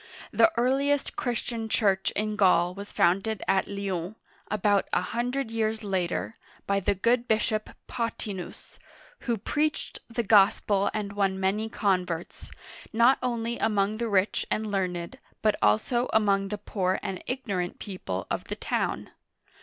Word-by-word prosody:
The 335 Hz, -, +5 dB
earliest 275 Hz, +4 st, +1 dB
Christian 235 Hz, -2 st, -3 dB
church 195 Hz, -3 st, +2 dB
in 215 Hz, 0 st, -1 dB
Gaul 180 Hz, -3 st, +4 dB
was 200 Hz, +2 st, -8 dB
founded 195 Hz, +4 st, +1 dB
at 190 Hz, -, +2 dB
Lyons, 195 Hz, -1 st, -3 dB, 0.3 s
about 205 Hz, -1 st, +2 dB
a -, -, +2 dB
hundred 245 Hz, +1 st, -2 dB
years 220 Hz, 0 st, -1 dB
later, 190 Hz, +2 st, -2 dB, 0.3 s
by 200 Hz, 0 st, +1 dB
the 200 Hz, +1 st, +1 dB
good 235 Hz, +5 st, +2 dB
bishop 215 Hz, 0 st, +1 dB, 0.2 s
Pothi'nus, 210 Hz, -6 st, -5 dB, 0.4 s
who 235 Hz, -2 st, -1 dB
preached 300 Hz, +9 st, -1 dB
the 235 Hz, 0 st, -1 dB
Gospel 200 Hz, -1 st, +4 dB
and 205 Hz, -2 st, -3 dB
won 195 Hz, -2 st, 0 dB
many 205 Hz, +4 st, 0 dB
converts, 180 Hz, -6 st, -1 dB, 0.4 s
not 235 Hz, +4 st, +5 dB
only 235 Hz, -2 st, -2 dB
among 210 Hz, -1 st, +1 dB
the 235 Hz, -1 st, -1 dB
rich 200 Hz, 0 st, +2 dB
and 215 Hz, -1 st, -1 dB
learned, 180 Hz, +3 st, -2 dB, 0.2 s
but 215 Hz, -1 st, +4 dB
also 240 Hz, -, +2 dB
among 200 Hz, -2 st, +3 dB
the 210 Hz, +1 st, -3 dB
poor 190 Hz, -2 st, -1 dB
and 195 Hz, -3 st, -4 dB
ignorant 200 Hz, -9 st, -2 dB
people 95 Hz, -, -5 dB
of -, -, -2 dB
the -, -, -4 dB
town. -, -, -2 dB
210 Hz, 140 wpm, -27 LUFS, 190-230 Hz, 0.4 s, The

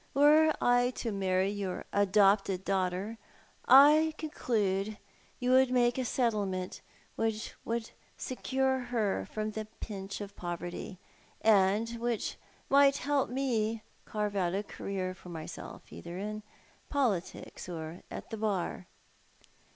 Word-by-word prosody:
Were 305 Hz, +3 st, +6 dB
I 245 Hz, 0 st, +4 dB
to 230 Hz, -, -3 dB
marry 190 Hz, -1 st, +1 dB
your 195 Hz, -3 st, -4 dB
adopted 195 Hz, -1 st, +3 dB
daughter 195 Hz, +3 st, -1 dB, 0.5 s
I 305 Hz, +4 st, +7 dB
conclude 215 Hz, -9 st, -1 dB, 0.4 s
you 250 Hz, 0 st, +1 dB
would 260 Hz, 0 st, +6 dB
make 245 Hz, 0 st, +2 dB
a 255 Hz, -, -1 dB
settlement 205 Hz, -7 st, -1 dB, 0.3 s
which 220 Hz, -1 st, -2 dB
would 230 Hz, 0 st, -2 dB, 0.3 s
secure 265 Hz, +1 st, 0 dB
her 235 Hz, -5 st, -1 dB
from 215 Hz, 0 st, -2 dB
the 215 Hz, 0 st, -5 dB
pinch 200 Hz, -2 st, -6 dB
of 205 Hz, -1 st, -7 dB
poverty, 175 Hz, +2 st, -5 dB, 0.5 s
and 210 Hz, 0 st, +4 dB
which 235 Hz, -2 st, -2 dB, 0.3 s
might 280 Hz, 0 st, +5 dB
help 285 Hz, 0 st, 0 dB
me 235 Hz, -4 st, 0 dB
to 220 Hz, -, -12 dB, 0.3 s
carve 210 Hz, -1 st, -1 dB
out 185 Hz, -2 st, +1 dB
a 200 Hz, -, -1 dB
career 190 Hz, -2 st, -4 dB
for 185 Hz, -, -13 dB
myself, 165 Hz, -1 st, -8 dB
either 170 Hz, +1 st, -7 dB
in 215 Hz, +2 st, -4 dB, 0.5 s
politics 215 Hz, -, -2 dB
or 160 Hz, 0 st, -6 dB
at -, -, -8 dB
the 225 Hz, -, -3 dB
Bar.'' 195 Hz, -4 st, -2 dB
215 Hz, 130 wpm, -31 LUFS, 190-245 Hz, 0.5 s, I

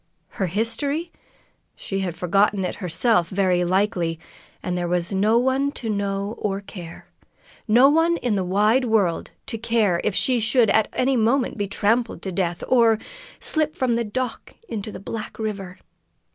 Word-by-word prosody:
Her 190 Hz, -, +2 dB
history? 280 Hz, -, -1 dB, 0.6 s
She 195 Hz, -, -4 dB
had 180 Hz, -3 st, -3 dB
forgotten 195 Hz, +2 st, +1 dB
it -, -, -2 dB
herself, 180 Hz, +1 st, +2 dB
very 185 Hz, -2 st, +1 dB
likely, 180 Hz, -3 st, 0 dB, 0.4 s
and 180 Hz, -, -2 dB
there 175 Hz, -1 st, -1 dB
was 175 Hz, +2 st, -1 dB
no 210 Hz, +4 st, +3 dB
one 265 Hz, +3 st, +1 dB
to 225 Hz, -3 st, -4 dB
know 200 Hz, 0 st, -2 dB
or 195 Hz, -2 st, -1 dB
care 175 Hz, -4 st, -10 dB, 0.6 s
no 240 Hz, +5 st, +6 dB
one 325 Hz, +3 st, +3 dB
in 245 Hz, -7 st, -1 dB
the 195 Hz, -2 st, 0 dB
wide 210 Hz, +7 st, +2 dB
world 205 Hz, -7 st, +1 dB, 0.2 s
to 230 Hz, -5 st, -4 dB
care 220 Hz, -6 st, +1 dB
if 215 Hz, -, 0 dB
she 250 Hz, -2 st, +2 dB
should 225 Hz, 0 st, +3 dB
at 220 Hz, -, +3 dB
any 265 Hz, +1 st, +1 dB
moment 245 Hz, +3 st, +1 dB
be 205 Hz, -2 st, -2 dB
trampled 225 Hz, +4 st, 0 dB
to 190 Hz, -, -3 dB
death, 175 Hz, -2 st, -2 dB
or 230 Hz, -3 st, +4 dB, 0.4 s
slip 310 Hz, -1 st, 0 dB
from 255 Hz, -2 st, 0 dB
the 235 Hz, 0 st, 0 dB
dock 250 Hz, +4 st, -4 dB
into 215 Hz, -1 st, -5 dB
the -, -, -8 dB
black 215 Hz, +3 st, -6 dB
river. 200 Hz, -4 st, -5 dB
210 Hz, 165 wpm, -23 LUFS, 190-240 Hz, 0.6 s, no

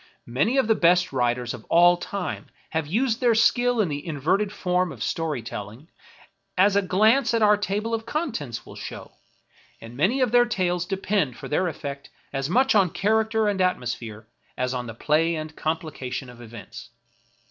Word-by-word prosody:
Many 150 Hz, -, 0 dB
of 265 Hz, -, +3 dB
the 225 Hz, -, +5 dB
best 180 Hz, -3 st, +3 dB
writ 120 Hz, -2 st, +1 dB
ers 120 Hz, -1 st, -4 dB
of -, -, -9 dB
all 175 Hz, +1 st, +5 dB
time 180 Hz, 0 st, -5 dB, 0.2 s
have 160 Hz, -2 st, -1 dB
used 230 Hz, -, 0 dB
their 240 Hz, -2 st, +4 dB
skill 245 Hz, +1 st, +3 dB
in 210 Hz, -, +3 dB
the 145 Hz, -2 st, -4 dB
inverted 170 Hz, +6 st, 0 dB
form 180 Hz, -3 st, 0 dB
of 120 Hz, -6 st, -6 dB
story 155 Hz, -7 st, -2 dB
telling, 115 Hz, -, -8 dB, 0.7 s
as 200 Hz, +2 st, +4 dB
a 200 Hz, -, +4 dB
glance 220 Hz, +6 st, +3 dB
at 225 Hz, -, +2 dB
our 210 Hz, 0 st, +6 dB
table 210 Hz, +2 st, -2 dB
of 225 Hz, 0 st, -1 dB
contents 230 Hz, -, -3 dB
will -, -, -12 dB
show; -, -, -8 dB, 0.7 s
and 115 Hz, +1 st, -11 dB
many 190 Hz, -, +1 dB
of 255 Hz, -4 st, +2 dB
their 240 Hz, 0 st, +5 dB
tales 180 Hz, -6 st, -1 dB
depend 190 Hz, -, -1 dB
for -, -, -8 dB
their 165 Hz, +5 st, +1 dB
efifect 140 Hz, -5 st, -5 dB, 0.3 s
as 135 Hz, +1 st, -2 dB
much 260 Hz, +7 st, +3 dB
on 195 Hz, -4 st, +4 dB
character 220 Hz, +3 st, +1 dB
and 200 Hz, -2 st, 0 dB
atmosphere 120 Hz, -, -2 dB, 0.3 s
as 125 Hz, 0 st, -1 dB
on 125 Hz, -1 st, -4 dB
the 115 Hz, -, -7 dB
play 160 Hz, +6 st, +1 dB
and 155 Hz, 0 st, -6 dB
complication 145 Hz, -5 st, -4 dB
of 120 Hz, 0 st, -14 dB
events. 115 Hz, -1 st, -10 dB
175 Hz, 180 wpm, -24 LUFS, 135-215 Hz, 0.7 s, our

